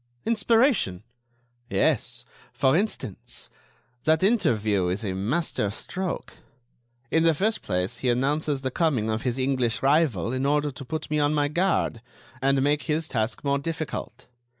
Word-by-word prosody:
"Inspiration!" 225 - +2 0.7
"Yes. - - 0 0.3
For 130 +2 +3
instance, 165 - -3 0.5
that 160 +2 +3
interview 110 - +2
is 95 +5 -2
a 95 - -1
master 105 - 0
stroke. 180 - -4 0.7
In 160 - +3
the 165 -1 +4
first 215 +7 0
place, 90 +1 -2
he 130 - 0
announces 140 +3 0
the 130 - -1
coming 125 -9 +1
of 110 0 -1
his 125 0 -1
English 130 -3 0
rival 135 - +2
in 130 0 -1
order 145 +1 +1
to 135 +1 -9
put 155 +4 -5
me 150 - +2
on 145 +1 +2
my 145 -1 +2
guard, 170 -8 0 0.4
and 135 0 +3
make 145 +1 +2
his 155 +1 0
task 110 -3 -2
more 140 -1 +1
difficult. 155 +1 -5
140 Hz, 150 wpm, -26 LUFS, 115-160 Hz, 0.7 s, the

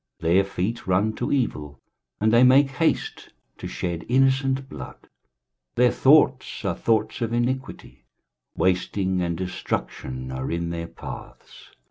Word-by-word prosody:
23:059:007 85 +1 +2
Their 95 +2 +5
feet 95 +4 -3
run 100 +4 +2
to 120 - -3
evil, 75 - -2 0.4
and 110 +1 +2
they 120 +2 +6
make 135 +2 +6
haste 160 +4 -1 0.3
to - - -5
shed 85 -2 -4
innocent 135 +1 +2
blood: 65 - -8 0.8
their 125 -1 +4
thoughts 135 -5 +3
are 95 - +1
thoughts 110 +5 0
of 115 0 -1
iniquity; 120 - -3 0.5
wasting 95 0 0
and 85 -1 -1
destruction 65 -7 -4
are 65 0 -4
in 85 0 -2
their 85 0 -4
paths. - - -11
105 Hz, 135 wpm, -24 LUFS, 85-130 Hz, 0.8 s, they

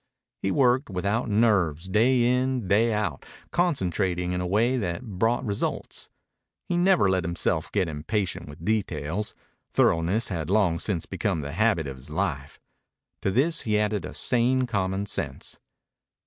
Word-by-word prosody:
He 95 - 0
worked 130 +2 +3
without 100 +5 -1
nerves, 95 -7 +2
day 120 +6 +3
in, 125 -2 +1
day 110 +4 +3
out, 105 -1 -2 0.3
concentrating 95 - 0
in 90 0 -1
a 90 - -2
way 115 +7 +2
that 90 -4 -2
brought 115 +3 0
results. 100 -2 -3 0.6
He 175 - 0
never 180 - +4
let 95 -1 +1
himself 85 -1 -1
get 95 -4 +1
impatient 85 +3 -3
with 75 +3 -10
details. 100 -3 -1 0.4
Thoroughness 90 +8 +2
had 85 -4 -3
long 95 -5 +2
since 95 -6 -1
become 95 -2 -2
the 70 0 -5
habit 100 -2 +2
of 70 -2 -6
his 65 - -11
life. - - -3 0.6
To - - +1
this 145 - +1
he 105 -2 +1
added 105 -3 0
a - - -7
sane 125 +2 +2
common 100 -4 -1
sense. - - -5
100 Hz, 150 wpm, -26 LUFS, 90-115 Hz, 0.6 s, never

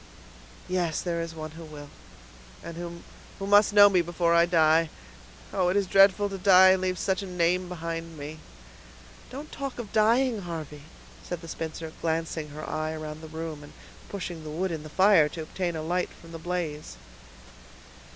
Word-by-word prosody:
"Yes, 180 -3 0
there 170 -2 -2
is 165 -1 -6
one 155 -1 -6
who 165 +1 -10
will, 150 -2 -10 0.7
who 170 +1 -7 0.4
must 205 +1 +5
know 205 0 +9
me 185 -3 +3
before 170 0 0
I 170 0 +5
die! 160 -1 +4 0.6
Oh! 180 - +2
it 185 - +1
is 200 - +2
dreadful 195 +2 +5
to 195 -1 -6
die, 185 0 +7
and 190 0 +3
leave 185 -1 -1
such 190 +2 0
a 195 - -6
name 180 0 0
behind 165 -1 -5
me." 150 +2 -7 0.9
"Don't 285 +4 -8
talk 275 -2 -5
of 225 -4 -7
dying, 225 +1 +3
Harvey," 155 -4 -7 0.4
said 175 -2 -6
the 165 - -10
spinster, 160 0 -6
glancing 160 -1 -2
her 150 +1 -8
eye 155 0 -2
around 155 0 -7
the 160 - -9
room, 160 -1 -6
and 145 - -13 0.4
pushing 175 -5 -6
the 155 - -7
wood 175 +4 -2
in 160 -2 -4
the 155 - -10
fire 185 -3 +5
to 160 0 -6
obtain 175 +1 -3
a 155 - -4
light 180 +3 -1
from 165 - -15
the 165 - -7
blaze. 160 - -4
170 Hz, 180 wpm, -27 LUFS, 160-185 Hz, 0.9 s, know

